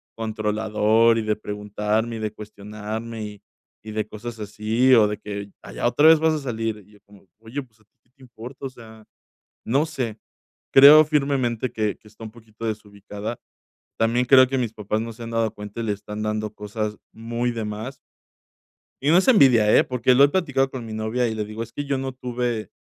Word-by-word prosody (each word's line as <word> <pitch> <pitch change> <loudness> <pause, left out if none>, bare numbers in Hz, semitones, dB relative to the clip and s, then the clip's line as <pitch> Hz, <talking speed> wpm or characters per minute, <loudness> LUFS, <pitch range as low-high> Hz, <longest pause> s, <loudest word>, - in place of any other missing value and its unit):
controlador 110 +1 +1
y 110 - -2
de 105 0 0
preguntarme 105 +2 -2
y - - -7
de 110 -1 -3
cuestionarme 105 +2 -7
y 105 -1 -10 0.4
y 110 - -8
de 110 0 -2
cosas 115 +2 -8
así, 110 +5 +1
o 110 -3 +5
de 105 0 -3
que: 100 -1 -7
"Ay, - - -11
¿ya - - +1
otra 145 +5 +4
vez 160 -1 +7
vas 160 0 +2
a 155 - -1
salir?". 115 -5 -4
Y 105 - -23
yo 105 - -20
como: 100 -1 -19
"Oye, 115 +6 -6
pues, 115 -3 -27
¿a - - -26
ti - - -59
que 125 - -39
te 135 - -28
importa?". 125 +3 -10
O - - -3
sea, 110 -3 -15 0.6
no 140 +7 +2
sé, 125 -8 -4 0.6
creo 145 +3 +10
firmemente 135 -5 0
que 105 -2 -1
que - - -21
está 110 +2 -14
un 110 - -7
poquito 115 -1 -11
desubicada. 105 0 -6 0.6
También 115 +2 +2
creo 130 +1 +7
que 135 +1 -2
mis 120 -3 -1
papás 105 +1 -2
no 115 0 -5
se 115 +1 -10
han 115 - -7
dado 115 -1 0
cuenta 105 +2 -7
y - - -3
le 110 - -1
están 105 +1 -7
dando 105 0 -2
cosas 105 0 -4 0.2
muy 115 +2 -3
de 115 -2 -4
más. 110 +5 -6 1.0
Y 140 - 0
no 165 - +6
es 190 - +3
envidia, 125 - +6
eh, - - +7
porque 125 0 +1
lo 140 +3 +7
he - - +5
platicado 140 -5 0
con 130 -3 -6
mi 110 - -8
novia 110 +3 -1
y 110 - -2
le 105 -1 -3
digo: 110 +2 -6
"Es 115 - -9
que 145 0 -5
yo 140 - 0
no 135 0 -4
tuve 125 -3 -3
115 Hz, 215 wpm, -23 LUFS, 105-125 Hz, 1.0 s, creo